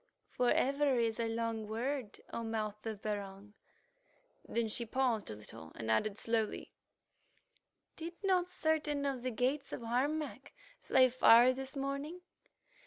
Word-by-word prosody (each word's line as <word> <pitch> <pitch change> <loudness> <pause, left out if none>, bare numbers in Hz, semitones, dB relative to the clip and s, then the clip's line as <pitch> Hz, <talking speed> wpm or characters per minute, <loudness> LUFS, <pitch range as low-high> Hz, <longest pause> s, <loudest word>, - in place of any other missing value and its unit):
"For 250 -1 +2
ever 275 0 +3
is 230 -1 +1
a 230 - +1
long 225 -1 -2
word, 235 +1 -3
O - - -2
Mouth 215 -1 -3
of 215 -2 -5
Barung." 205 -1 -5 1.0
Then 230 -1 0
she 220 +2 -1
paused 235 -2 0
a 105 - -5
little, 80 -6 -10
and 110 0 -3
added 200 - +1
slowly, 225 -2 -1 1.3
"Did 335 +1 -6
not 365 -2 +2
certain 310 -4 0
of 270 -3 -1
the 255 - -1
gates 260 +4 -1
of - - -5
Harmac 270 +1 -1 0.3
fly 260 -1 +5
far 245 0 +7
this 265 +1 -7
morning? 280 +5 -3
240 Hz, 140 wpm, -34 LUFS, 220-275 Hz, 1.3 s, far